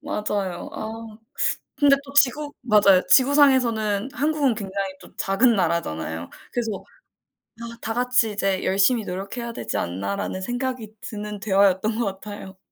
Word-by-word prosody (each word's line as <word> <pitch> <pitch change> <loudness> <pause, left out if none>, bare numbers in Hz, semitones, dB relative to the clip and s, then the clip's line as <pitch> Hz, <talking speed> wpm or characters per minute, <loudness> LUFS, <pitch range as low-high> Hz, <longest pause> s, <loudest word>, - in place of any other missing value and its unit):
맞아요. 200 -4 -3
아 220 0 -7 0.6
근데 285 -1 +6
또 280 0 -12
지구 290 +2 +3
맞아요. 205 -6 +5
지구상에서는 255 -6 +4
한국은 290 -2 +1
굉장히 195 -2 -4
또 - - -16
작은 225 +5 +3
나라잖아요. 85 - -2 0.2
그래서 225 -5 -3 0.8
아 235 0 -7
다 225 - -3
같이 245 -2 +2
이제 195 -2 -1
열심히 200 +4 +3
노력해야 200 +6 -5
되지 - - -4
않나라는 100 - -3
생각이 245 0 -4
드는 210 -1 -6
대화였던 200 +2 +2
것 235 - +1
같아요. 200 -2 -9
215 Hz, 315 characters per minute, -23 LUFS, 195-245 Hz, 0.8 s, 근데